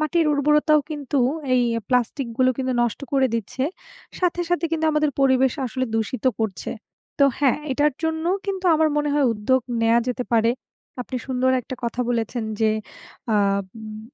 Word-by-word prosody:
মাটির 310 +1 +1
উর্বরতাও 300 +1 +3
কিন্তু 290 -2 -2 0.4
এই 250 - +4 0.3
প্লাস্টিক 250 +1 0
গুলো 255 0 +4
কিন্তু 260 -1 -1
নষ্ট 235 - -1
করে 270 -1 +4
দিচ্ছে। 230 +4 -2 0.5
সাথে, 355 -1 0
সাথে 350 -1 +1
কিন্তু 320 -1 0
আমাদের 300 -1 +2
পরিবেশ 260 -1 +4
আসলে 255 +2 -2
দূষিত 225 +4 -2
করছে। 220 -4 -3 0.5
তো 280 - +6
হ্যাঁ, 280 -1 +3
এটার 290 +2 +2
জন্যও 320 +3 0
কিন্তু 385 -1 -3
আমার 315 0 +3
মনে 295 0 +1
হয় 290 -3 +3
উদ্যোগ 240 +5 +1 0.2
নেয়া 230 +1 +4
যেতে 250 0 -2
পারে। 230 0 +4 0.5
আপনি 255 +1 -6
সুন্দর 260 0 +1
একটা 260 - -6
কথা 235 +1 -2
বলেছেন 230 0 -1 0.2
যে, 220 -1 +4 0.6
আ - - +3 0.4
উম 215 0 -8
260 Hz, 160 wpm, -23 LUFS, 235-300 Hz, 0.6 s, তো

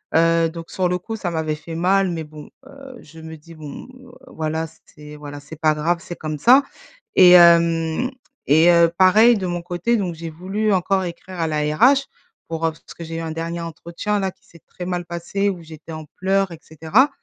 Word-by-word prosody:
Heu, 165 0 +3
donc 165 0 -9
sur 185 -1 -1
le 180 - 0
coup 225 +5 -7
ça 180 -5 -4
m'avait 155 -2 -2
fait 165 +2 -9
mal. 190 +3 +2
Mais 160 -2 -4
bon, 150 -1 -12 0.2
heu, 275 -1 -12
je 160 +2 -14
me 160 0 -9
dis: 165 +3 -15
«Bon, 150 - -9 0.2
heu, 250 - -15 0.2
voilà, 160 +1 -3 0.2
c'est, 150 0 -13
voilà, 145 -1 -9
c'est 145 +2 -12
pas 155 -1 +4
grave, 170 +3 0
c'est 175 - -8
comme 155 -1 -5
ça» 255 - +6 0.5
et 180 -1 +8
hem 170 - +5 0.4
et 160 +4 +5
heu, 170 -1 +5
pareil 215 +5 +6
de 190 - -3
mon 175 -1 -3
côté 175 +7 -1
donc 185 -5 -2
j'ai 165 0 -7
voulu 195 +6 -2
encore 190 0 +1
écrire 175 +1 -8
à 165 - 0
la 150 -1 -1
RH, 270 - +5 0.5
pour 165 0 -2
heu - - -1
parce 155 - -15
que 170 - -8
j'ai 165 - -7
eu - - -3
un 160 -1 -4
dernier 165 +1 -4
entretien 170 +5 -4
là 190 -1 -1
qui - - -33
s'est 170 - -19
très 180 - -8
mal 175 -1 -3
passé 175 +4 -2
où 180 -3 -6
j'étais 160 0 -11
en 155 -1 -7
pleurs 195 0 0
et 165 - -9
cetera 160 - +1
170 Hz, 220 wpm, -21 LUFS, 160-190 Hz, 0.5 s, et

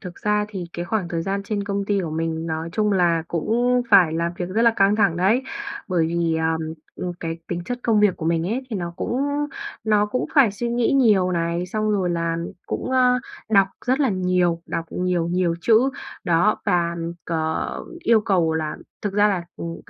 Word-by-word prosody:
thực 180 -3 -8
ra 210 0 +1
thì 190 -4 -5
cái 175 - -4
khoảng 195 -2 -1
thời 165 -1 -2
gian 195 +2 -2
trên 205 -1 -3
công 200 0 -2
ty 200 -1 +1
của 165 -4 -3
mình 160 0 -2
nói 160 0 -3
chung 210 0 +1
là 170 -3 +2
cũng 240 +8 +1
phải 170 -4 +6
làm 170 +1 -1
việc 175 - -3
rất 220 +5 +1
là 235 - +6
căng 195 +1 +4
thẳng 170 -6 +3
đấy. 210 +9 +3 0.5
Bởi 170 -4 +2
vì, 170 -1 0
à, 160 0 +1 0.4
ừm, 180 -1 -3
cái 165 0 -4
tính 175 0 -3
chất 245 +6 -4
công 220 -3 +3
việc 205 -3 +3
của 160 - -4
mình 165 0 +1
ấy 235 +7 -1
thì 215 - -2
nó 170 -2 -4
cũng 255 +7 -1 0.6
nó 210 -1 +3
cũng 250 +4 -1
phải 260 -8 +5
suy 235 +4 -3
nghĩ 240 +1 +1
nhiều 210 -9 +4
này, 170 +1 -1
xong 215 +3 -1
rồi 190 -4 +1
là 165 -1 -1 0.3
cũng, - - -3
ơ, 250 -1 +4 0.3
đọc 195 -2 +5 0.2
rất 260 +3 +2
là 275 - +3
nhiều, 180 -3 +1
đọc 165 - -3
nhiều, 180 -2 0
nhiều 175 -1 +1
chữ, 235 +6 +4 0.3
đó, 175 +4 +2
và 170 -1 +1 0.3
c - - -9 0.7
yêu 230 -2 +5
cầu 175 -6 +1
là 155 -1 -2 0.3
thực 205 -2 -2
ra 205 +1 +4
là, 185 -4 -1
ừm, 165 0 -5
185 Hz, 210 wpm, -22 LUFS, 170-215 Hz, 0.7 s, phải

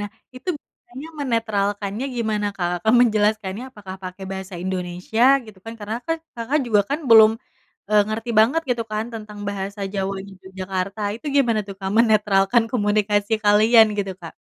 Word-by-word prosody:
Nah, 205 - -4 0.3
itu 255 - -10
biasanya 265 +2 -13
menetralkannya 210 -3 -1
gimana, 215 -3 -1
Kak? 175 -1 -2
Kakak 220 +2 +3
menjelaskannya 215 -2 +1
apakah 195 -5 -9
pakai 185 +1 -7
bahasa 190 0 -7
Indonesia, 185 +4 -2 0.2
gitu, 215 -3 -14
kan? 225 0 -7
Karena, 210 +2 -4
kan, 325 - 0 0.2
Kakak 235 +6 0
juga, 215 -3 +4
kan, 285 - 0
belum, 220 -1 +8 0.6
eee, 210 -1 +5
ngerti 225 +2 -4
banget, 265 +9 +3
gitu, 240 -2 0
kan, 215 +1 -1
tentang 210 -2 -8
bahasa 200 +1 -5
Jawanya 195 0 -3
Yogyakarta, 190 +1 -5
itu 235 +7 -10
gimana, 235 -6 +3
tuh, 195 -1 -8
Kak, 190 0 -3
menetralkan 215 0 +3
komunikasi 205 -2 +1
kalian, 220 +2 +6
gitu, 195 -1 -2
Kak? 165 -2 -9
210 Hz, 160 wpm, -22 LUFS, 195-230 Hz, 0.6 s, belum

